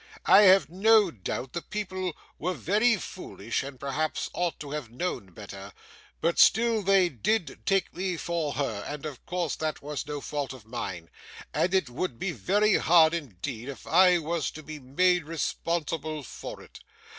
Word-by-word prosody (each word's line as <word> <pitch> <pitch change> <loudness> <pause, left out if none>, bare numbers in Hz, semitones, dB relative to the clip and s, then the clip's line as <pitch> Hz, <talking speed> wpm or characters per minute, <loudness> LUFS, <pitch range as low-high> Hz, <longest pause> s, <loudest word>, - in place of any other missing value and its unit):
I 195 - +8
have 185 -6 +6
no 205 +3 +4
doubt 125 - -5
the 170 - -3
people 185 -4 -4 0.2
were 180 +3 -1
very 215 +8 +3
foolish, 115 - -4
and 135 -2 -8
perhaps 150 +3 -2
ought 175 -1 -1
to 145 -2 -7
have 150 -6 -4
known 125 - -3
better, 100 +1 -10 0.5
but 170 +1 +1
still 230 0 +5
they 195 -2 +4
did 170 - -1
take 195 -1 +1
me 185 -1 -2
for 165 -3 -2
her, 115 -8 -2
and 150 0 -6
of 145 -5 -7
course 175 -4 -1
that 155 -2 -3
was 150 0 -4
no 150 -1 -4
fault 140 -2 -4
of 125 -5 -13
mine, 95 -8 -6 0.4
and 180 - +1
it 185 -7 +2
would 125 +1 -3
be 190 +5 -2
very 205 +4 +2
hard 165 -1 +5
indeed 120 - -5
if 140 - -8
I 180 +3 +6
was 165 -2 -2
to 155 - -9
be 155 +1 -8
made 175 +6 +2
responsible 155 -1 -2
for - - -8
it. - - -14
160 Hz, 170 wpm, -28 LUFS, 135-185 Hz, 0.5 s, I